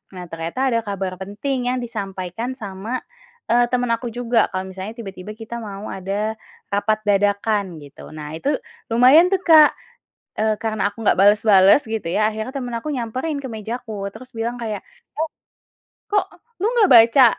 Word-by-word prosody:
Nah 180 -1 -7
ternyata 170 +12 -1
ada 230 - +2
kabar 190 -2 -3
penting 245 +6 -3
yang - - -1
disampaikan 200 +1 -4
sama, 210 +3 -5 0.5
eee, 240 +1 +4
temen 245 -1 0
aku 235 +1 -3
juga 240 -1 +2
kalau 185 0 -2
misalnya 190 +3 -7
tiba-tiba 195 -2 -8
kita 225 +1 -7
mau 200 -1 -7
ada 200 +3 -2 0.4
rapat 215 +2 +1
dadakan 200 -3 +1
gitu. 140 0 -12
Nah 150 0 -7
itu 275 - -2 0.4
lumayan 265 +9 +7
tuh 380 - +1
Kak, 315 -4 +8 0.7
eee, 215 0 +2
karena 215 -3 0
aku 225 +2 -9
nggak - - +5
bales-bales 205 +3 +6
gitu 220 -2 -3
ya, 215 +5 +2
akhirnya 220 +3 -5
temen 245 -3 -4
aku 265 +7 -5
nyamperin 260 +4 -3
ke - - -4
meja 220 +3 -5
aku 205 -4 -5
terus 255 +3 -12
bilang 230 +2 -2
kayak, 215 -3 -3 0.4
"Eh, 320 - 0 0.8
kok 405 -2 +3 0.4
lo - - +1 0.2
gak 400 - +5
baca, 230 +3 +7
220 Hz, 165 wpm, -21 LUFS, 195-245 Hz, 0.8 s, Kak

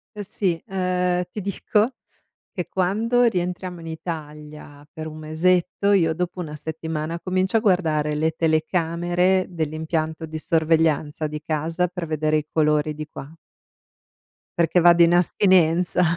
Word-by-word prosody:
Eh 205 - -5
sì, 185 -4 -2
uhm, 180 -1 0
ti 210 - -5
dico 210 +5 0 0.6
che 180 -5 -4
quando 215 +8 +1
rientriamo 180 -4 -2
in 165 - -8
Italia 150 -2 -8
per 160 -1 -7
un 155 0 -8
mesetto, 175 +5 +1
io 165 -5 +3 0.2
dopo1 155 -4 -5
settimana 160 +1 -4
comincio 185 +4 +1
a - - -1
guardare 160 -7 +1
le 155 +2 +1
telecamere 175 +3 +1
dell'impianto 160 0 -3
di 160 0 -5
sorveglianza 160 -2 +1
di 150 0 -6
casa 165 +3 -1
per 180 -1 -6
vedere 155 0 0
i 150 - -4
colori 150 -1 +1
di 150 0 -6
qua. 145 +1 -10 1.2
Perché 170 +1 +3
vado 175 0 +6
in 170 +1 +4
astinenza, 180 -1 +3
165 Hz, 135 wpm, -23 LUFS, 155-180 Hz, 1.2 s, vado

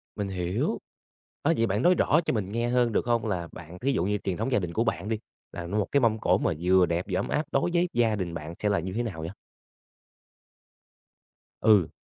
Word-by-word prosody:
Mình 100 -1 -2
hiểu, 90 -2 -1 0.7
á - - +4
vậy 115 - +3
bạn 100 +2 0
nói 180 +4 +5
rõ 155 -1 +3
cho - - +1
mình 105 -5 -2
nghe 115 +2 0
hơn 125 -1 +2
được 110 - 0
hông 120 -1 +1
là 90 -5 -2
bạn 90 +1 -10
thí 135 +3 +1
dụ 85 - +1
như 105 +1 +1
truyền 95 -3 -2
thống 115 +5 -2
gia 125 - +3
đình 90 -3 -4
của 110 - +1
bạn 100 -3 -2
đi, 110 -1 -1 0.3
là 85 -1 -6
nuôi 105 +5 -1
một 105 - 0
cái 140 - +4
mâm 110 -2 +2
cỗ - - +3
mà - - 0
vừa 90 +1 +5
đẹp 85 +3 -1
vừa 90 - +1
ấm - - -2
áp 150 - 0
đối 135 +6 +2
với 175 +1 +2
gia 115 -2 +2
đình 90 -4 -3
bạn 80 0 -6
sẽ 105 - +1
là 100 - +2
như 90 +3 -4
thế 120 +4 -1
nào 95 -9 -5
vậy? 80 - -4 2.3
Ừ. 100 -8 +5
105 Hz, 245 wpm, -27 LUFS, 90-115 Hz, 2.3 s, nói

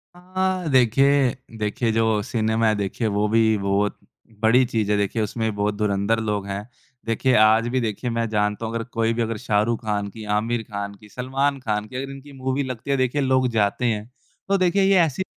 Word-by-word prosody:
हाँ, 185 -1 -2
देखिए 130 +2 +4 0.2
देखिए 110 +2 -1
जो 110 -1 +2
सिनेमा 110 0 0
है 110 - +3
देखिए 105 +3 -2
वो 105 +1 +1
भी 110 -1 +3
बहुत 100 +1 0 0.4
बड़ी 115 +4 +5
चीज़ 110 -3 -1
है, 105 - +3
देखिए 100 +2 0
उसमें 110 +2 -1
भी 105 - -5
बहुत 105 0 0
धुरंधर 105 +1 +1
लोग 105 -3 -2
हैं। 100 +3 -5 0.4
देखिए 115 +3 +1
आज 110 +2 +5
भी 130 +1 0
देखिए 115 +2 -2
मैं 115 0 -1
जानता 105 +1 0
हूँ 110 - -4
अगर 115 - -1
कोई 115 -1 -1
भी 120 - -1
अगर 115 -1 -2
शाहरुख 110 0 0
ख़ान 105 -2 -1
की, 110 +1 -10
आमिर 110 +3 0
ख़ान 100 -1 -5
की, 105 +1 -17
सलमान 135 +3 -1
ख़ान 105 -4 -2
की 125 - -12
अगर 135 +1 -4
इनकी 135 +1 -11
मूवी 130 +1 -2
लगती 130 +1 -5
है, 140 - +2
देखिए 130 +3 +1
लोग 130 -1 +2
जाते 110 +2 +1
हैं। 110 0 -1 0.4
तो 195 0 +2
देखिए 185 +1 +2
ये 195 0 +4
ऐसी 160 +5 -3
115 Hz, 205 wpm, -23 LUFS, 105-130 Hz, 0.4 s, बड़ी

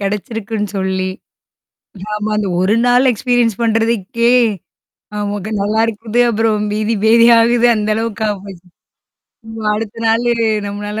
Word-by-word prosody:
கெடைச்சிருக்குன்னு 210 +1 -3
சொல்லி 190 0 -2 1.0
ஆமா, 210 0 -3
அந்த 210 -2 -1
1 195 +4 +2
நாள் 250 +2 +4
எக்ஸ்பீரியன்ஸ் 240 -2 0
பண்றதுக்கே 230 0 +1 0.9
ஆமாங்க 205 0 -4
நல்லாருக்கும்ன்னு, 220 +2 0
அப்புறம் 215 -1 0
பீதி 215 +2 -1
பேதி 230 +1 +5
ஆகுது 235 +1 +3
அந்த 215 0 -2
அளவுக்காயி 220 -2 -2
போச்சு 190 -3 -12 0.9
வ்வ 220 - -6
அடுத்த 215 0 -5
நாளு 235 +2 +2 0.4
நம்மளால 205 +1 -5
215 Hz, 115 wpm, -16 LUFS, 205-230 Hz, 1.0 s, பேதி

